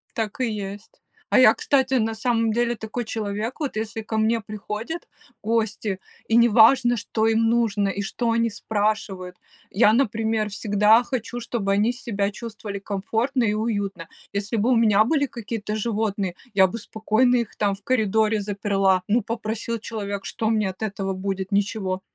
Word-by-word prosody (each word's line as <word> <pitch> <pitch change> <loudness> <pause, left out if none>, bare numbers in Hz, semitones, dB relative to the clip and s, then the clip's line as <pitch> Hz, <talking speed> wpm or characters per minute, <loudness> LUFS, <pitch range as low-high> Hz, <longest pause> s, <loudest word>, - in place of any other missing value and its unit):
Так 220 -1 -3
и - - +3
есть. 205 0 -6 0.4
А - - +5
я, - - +8
кстати, 270 - +1
на 225 -3 +2
самом 230 0 +1
деле 240 +1 +1
такой 225 +2 -5
человек. 215 +2 -3
Вот 280 -7 -2
если 220 +1 -3
ко 220 0 -4
мне 225 +1 +2
приходят 215 - -6 0.3
гости, 215 -3 -1 0.3
и 225 - +2
не 235 0 +6
важно, 240 +2 +5
что 220 0 -1
им 225 0 +3
нужно 220 -4 +1
и 195 +1 -2
что 230 +4 -1
они 230 0 +2
спрашивают, 205 -4 -2 0.3
я, 215 +1 +4
например, 220 -3 +1
всегда 210 +2 +4
хочу, 245 -1 -4
чтобы 225 -4 -2
они 210 +4 +2
себя 205 -5 -2
чувствовали 210 -2 -7
комфортно 225 +6 -1
и 210 - +1
уютно. 205 -5 -2 0.2
Если 200 +3 -2
бы 225 +5 +2
у - - +5
меня 215 -2 +4
были 285 +3 +2
какие-то 220 -4 -5
животные, 205 -4 -1 0.2
я 190 -2 +5
бы 220 - -5
спокойно 225 +3 +1
их 235 -3 -3
там 205 -2 0
в 195 - -20
коридоре 220 -3 +2
заперла, 195 -2 +1
ну, 230 +4 +3
попросил 230 +1 -3
человек, 200 -3 -5
что 220 -1 -2
мне 215 -3 +1
от 185 - -10
этого 195 -2 -2
будет? 190 +1 -3
Ничего. 200 -2 0
220 Hz, 170 wpm, -24 LUFS, 200-230 Hz, 0.4 s, я